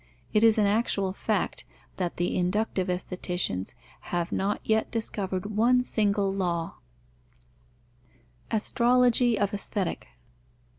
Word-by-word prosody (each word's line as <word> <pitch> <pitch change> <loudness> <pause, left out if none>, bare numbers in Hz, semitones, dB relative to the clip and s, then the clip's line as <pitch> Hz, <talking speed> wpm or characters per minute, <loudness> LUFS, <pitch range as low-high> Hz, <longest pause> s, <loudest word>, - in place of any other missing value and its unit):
It 210 - +4
is 225 -1 +6
an 210 - +4
actual 200 -2 +1
fact, - - -1 0.3
that 180 -2 -3
the 175 - 0
inductive 185 +1 0
aestheticians 180 - -2 0.3
have 175 -1 -1
not 200 +2 -1
yet 220 0 +1
discovered 205 -3 -3
one 250 +3 +4
single 200 -4 +1
law. 175 -4 -2 1.7
_Astrology 240 +1 +3
of 200 0 0
Aesthetic. 200 -2 -2
200 Hz, 105 wpm, -27 LUFS, 180-220 Hz, 1.7 s, is